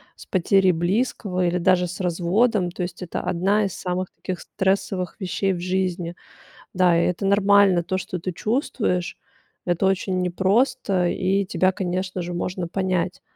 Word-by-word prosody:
с - - -13
потерей 190 0 +3
близкого 185 +1 0
или 175 +1 0
даже 180 0 +3
с 180 - -7
разводом. 185 +3 +1
То 180 - -4
есть 175 +1 -6
это 175 - -4
одна 200 +4 +1
из 195 - -3
самых 180 0 -3
таких 185 -2 -5
стрессовых 190 -1 -1
вещей 195 0 -1
в 175 - -4
жизни. 180 -1 -2 0.6
Да, 180 -2 +4
и - - +2
это 180 +2 -2
нормально 200 -2 +4
то, 185 +2 -2
что 185 -1 -5
ты 185 +2 -3
чувствуешь, 210 - -1 0.5
это 175 +1 +1
очень 190 -1 +1
непросто, 185 0 +1
и 195 +1 +1
тебя, 185 0 +2
конечно 185 0 -3
же, 175 +1 -5
можно 175 0 -3
понять. 185 0 -1
185 Hz, 155 wpm, -23 LUFS, 180-195 Hz, 0.6 s, Да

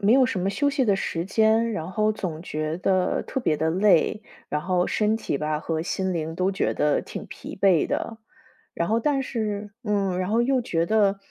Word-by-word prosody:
没 210 +3 +4
有 265 0 +6
什 250 -7 -1
么 185 - 0
休 285 +8 +1
息 275 -3 +1
的 200 -2 +3
时 170 -2 -3
间， 220 +3 +3
然 165 -4 -4
后 215 +2 +1
总 175 -7 -5
觉 155 -1 -3
得 185 0 +1
特 265 - -3
别 155 -10 +1
地 160 - +1
累， 195 +2 +3 0.3
然 150 - -2
后 180 0 +1
身 215 0 +1
体 145 - -2
吧 150 +1 -2
和 160 0 -2
心 190 +2 -2
灵 160 -1 -3
都 185 +3 +1
觉 190 - 0
得 150 -1 +1
挺 - - -7
疲 - - -9
惫 185 -5 +4
的。 225 - -3 0.6
然 170 - -1
后 225 - +2
但 275 +3 +1
是 210 -5 -3
嗯， 200 -4 0
然 185 +1 -2
后 225 +2 +3
又 255 +1 +2
觉 165 -6 0
得， 200 -1 +2
195 Hz, 230 characters per minute, -25 LUFS, 170-220 Hz, 0.6 s, 有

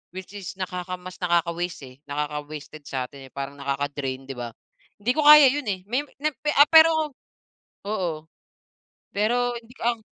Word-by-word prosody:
Which 185 +1 -8
is 195 -2 -7
nakaka 180 0 -4
mas 180 0 -9
nakaka-waste 175 -1 0
eh, 130 - -14
nakaka-wasted 150 +1 -5
sa'tin 135 +1 -5
parang 140 0 -5
nakaka-drain, 140 -1 -3
'di 135 - -6
ba? 120 -1 -4 0.5
Hindi 220 +4 +1
ko 310 - +2
kaya 300 -1 +10
yun 290 0 -3
eh, 185 -2 -2
may 250 +6 +1 0.2
ni 305 - +2 0.3
ah, 290 +1 +8
pero 320 -2 +6 0.7
oo. 175 -7 -2 0.9
Pero 240 +4 +1
hindi 235 +1 -14
ang 235 0 +1
180 Hz, 150 wpm, -25 LUFS, 145-240 Hz, 0.9 s, kaya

